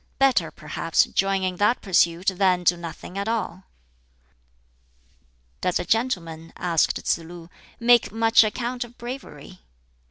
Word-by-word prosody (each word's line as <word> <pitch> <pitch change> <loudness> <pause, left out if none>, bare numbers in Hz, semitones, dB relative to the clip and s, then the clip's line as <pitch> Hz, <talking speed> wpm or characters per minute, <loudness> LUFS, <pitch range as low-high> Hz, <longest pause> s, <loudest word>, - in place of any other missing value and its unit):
Better, 270 -1 +3
perhaps, - - 0
join 195 0 0
in 185 -1 -2
that 210 +5 +2
pursuit 180 -1 +2
than 185 -1 +2
do 175 0 +4
nothing 170 +2 -8
at 200 - -3
all!" 205 -5 -3 2.0
"Does 180 - +1
a - - -4
gentleman," 165 -9 -2
asked 170 -3 +1
Tsz - - 0
lu, 170 +1 -12 0.3
"make 240 0 +4
much 225 0 +4
account 240 +3 -3
of 240 0 -15
bravery?" 235 - -9
190 Hz, 130 wpm, -24 LUFS, 170-230 Hz, 2.0 s, do